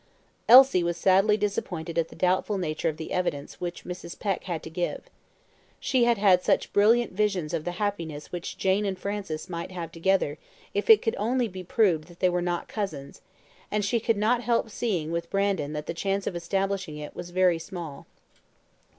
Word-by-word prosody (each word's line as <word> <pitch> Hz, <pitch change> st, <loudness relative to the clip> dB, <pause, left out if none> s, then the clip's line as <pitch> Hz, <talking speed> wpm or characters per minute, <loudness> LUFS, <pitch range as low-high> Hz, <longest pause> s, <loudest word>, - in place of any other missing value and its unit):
Elsie 255 Hz, -5 st, +9 dB
was 170 Hz, 0 st, -1 dB
sadly 195 Hz, +3 st, +4 dB
disappointed 180 Hz, -5 st, -3 dB
at 165 Hz, -1 st, +1 dB
the -, -, -14 dB
doubtful 185 Hz, +3 st, +1 dB
nature 165 Hz, -2 st, -1 dB
of 155 Hz, -, -5 dB
the 160 Hz, -, -7 dB
evidence 175 Hz, -6 st, -3 dB
which 175 Hz, -1 st, -4 dB
Mrs. 180 Hz, -1 st, -7 dB
Peck 195 Hz, -3 st, -2 dB
had 170 Hz, -4 st, -4 dB
to -, -, -7 dB
give. 175 Hz, +2 st, -3 dB, 0.8 s
She 255 Hz, -3 st, +2 dB
had 235 Hz, -1 st, +3 dB
had 190 Hz, -3 st, +5 dB
such -, -, +1 dB
brilliant 230 Hz, +3 st, +4 dB
visions 190 Hz, -6 st, 0 dB
of 160 Hz, -2 st, -2 dB
the 175 Hz, -, -2 dB
happiness 170 Hz, -7 st, -4 dB
which 175 Hz, -1 st, -5 dB
Jane 190 Hz, +2 st, +2 dB
and 195 Hz, -2 st, -2 dB
Francis 195 Hz, -5 st, -4 dB
might 170 Hz, -2 st, -5 dB
have 170 Hz, -3 st, -6 dB
together 165 Hz, -3 st, 0 dB, 0.3 s
if 205 Hz, 0 st, -2 dB
it 215 Hz, -1 st, +8 dB
could 225 Hz, -, 0 dB
only 240 Hz, +3 st, +1 dB
be 185 Hz, -2 st, -8 dB
proved 180 Hz, -5 st, +2 dB
that 175 Hz, 0 st, -17 dB
they 185 Hz, -, +3 dB
were 180 Hz, 0 st, 0 dB
not 175 Hz, -1 st, -2 dB
cousins; 155 Hz, -10 st, -5 dB, 0.5 s
and 210 Hz, -1 st, 0 dB
she 230 Hz, +3 st, +1 dB
could 230 Hz, -1 st, +1 dB
not 230 Hz, +4 st, +2 dB
help 230 Hz, -1 st, 0 dB
seeing 180 Hz, -10 st, -2 dB
with 170 Hz, 0 st, -3 dB
Brandon 195 Hz, -7 st, 0 dB
that 150 Hz, 0 st, -4 dB
the -, -, -3 dB
chance 195 Hz, +3 st, -1 dB
of -, -, -3 dB
establishing 190 Hz, -1 st, -2 dB
it 150 Hz, 0 st, -8 dB
was 175 Hz, -, -7 dB
very 180 Hz, -2 st, +3 dB
small. 165 Hz, -3 st, -8 dB
185 Hz, 195 wpm, -27 LUFS, 170-205 Hz, 0.8 s, Elsie